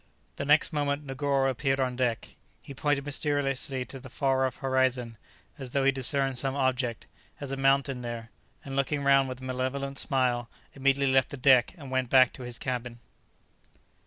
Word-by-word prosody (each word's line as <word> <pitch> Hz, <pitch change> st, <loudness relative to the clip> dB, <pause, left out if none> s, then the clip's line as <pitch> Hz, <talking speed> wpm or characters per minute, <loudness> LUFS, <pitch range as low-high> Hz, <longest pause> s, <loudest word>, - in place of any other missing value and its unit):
The -, -, -3 dB
next 150 Hz, +3 st, +3 dB
moment 145 Hz, 0 st, -1 dB
Negoro 135 Hz, 0 st, 0 dB
appeared 135 Hz, +1 st, 0 dB
on 130 Hz, -1 st, 0 dB
deck; 120 Hz, -2 st, -1 dB, 0.3 s
he 140 Hz, -, -9 dB
pointed 145 Hz, 0 st, 0 dB
mysteriously 140 Hz, -3 st, -1 dB
to 135 Hz, -, -9 dB
the 130 Hz, +1 st, -11 dB
far 130 Hz, +1 st, +1 dB
off 130 Hz, -, -7 dB
horizon, 130 Hz, -3 st, 0 dB, 0.4 s
as 130 Hz, -2 st, -6 dB
though 135 Hz, +2 st, 0 dB
he 135 Hz, -, +5 dB
discerned 135 Hz, -1 st, 0 dB
some 135 Hz, 0 st, -2 dB
object, 130 Hz, -4 st, -1 dB, 0.3 s
as 140 Hz, -2 st, -5 dB
a -, -, -1 dB
mountain, 135 Hz, -1 st, +1 dB
there; 115 Hz, -1 st, -6 dB, 0.3 s
and 135 Hz, -1 st, -6 dB
looking 140 Hz, +1 st, 0 dB
round 135 Hz, -1 st, +4 dB
with 130 Hz, 0 st, -7 dB
a -, -, -10 dB
malevolent 130 Hz, +2 st, -3 dB
smile, 125 Hz, -3 st, +1 dB, 0.2 s
immediately 140 Hz, 0 st, +2 dB
left 130 Hz, -1 st, +3 dB
the 145 Hz, -, -7 dB
deck, 130 Hz, +3 st, +4 dB
and 140 Hz, -5 st, -10 dB
went 130 Hz, -2 st, 0 dB
back 130 Hz, -1 st, +5 dB
to -, -, -10 dB
his 120 Hz, -1 st, -6 dB
cabin. 125 Hz, -2 st, -4 dB
135 Hz, 180 wpm, -28 LUFS, 130-140 Hz, 0.4 s, he